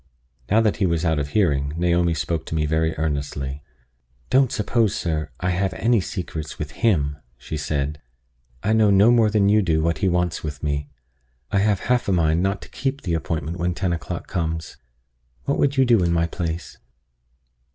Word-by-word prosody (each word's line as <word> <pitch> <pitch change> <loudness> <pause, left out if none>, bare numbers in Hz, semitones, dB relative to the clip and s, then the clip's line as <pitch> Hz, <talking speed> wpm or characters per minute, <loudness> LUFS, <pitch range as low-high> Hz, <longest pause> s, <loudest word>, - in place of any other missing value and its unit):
Now 110 +3 +4
that 110 -2 +1
he 95 - +2
was 85 0 0
out 80 -2 +2
of 70 - -2
hearing, 70 -7 +1
Naomi 85 -1 +2
spoke 80 -1 -2
to - - -3
me 75 -1 +1
very 80 +1 0
earnestly: 70 -2 -3 0.7
"Don't 130 0 +4
suppose, 110 -1 +1
sir, 80 -3 -2
I 90 0 0
have 95 +1 -1
any 115 -2 +2
secrets 85 -7 -5
with 75 -1 -5
him," 75 -11 +1 0.2
she 80 - -6
said. 75 -1 -2 0.6
"I 110 - +2
know 110 -2 +4
no 100 +4 +6
more 115 -3 +4
than 105 -2 +3
you 105 +1 +4
do 80 -4 +1
what 85 -1 0
he 95 - +2
wants 90 -1 0
with 75 -3 -6
me. 70 -1 -2 0.6
I 100 - +2
have 100 -2 +2
half 125 0 +1
a - - +2
mind 80 -2 +2
not 95 +1 -1
to - - -12
keep 135 +2 -3
the 85 - -2
appointment 80 0 -2
when 90 0 0
ten 95 -1 0
o'clock 85 +1 -5
comes. 80 -2 -3 0.7
What 140 - -1
would 140 -1 +2
you 135 - +5
do 120 -5 +4
in 85 -1 +1
my 85 0 +2
place?" 85 -1 -4
85 Hz, 195 wpm, -23 LUFS, 80-100 Hz, 0.7 s, no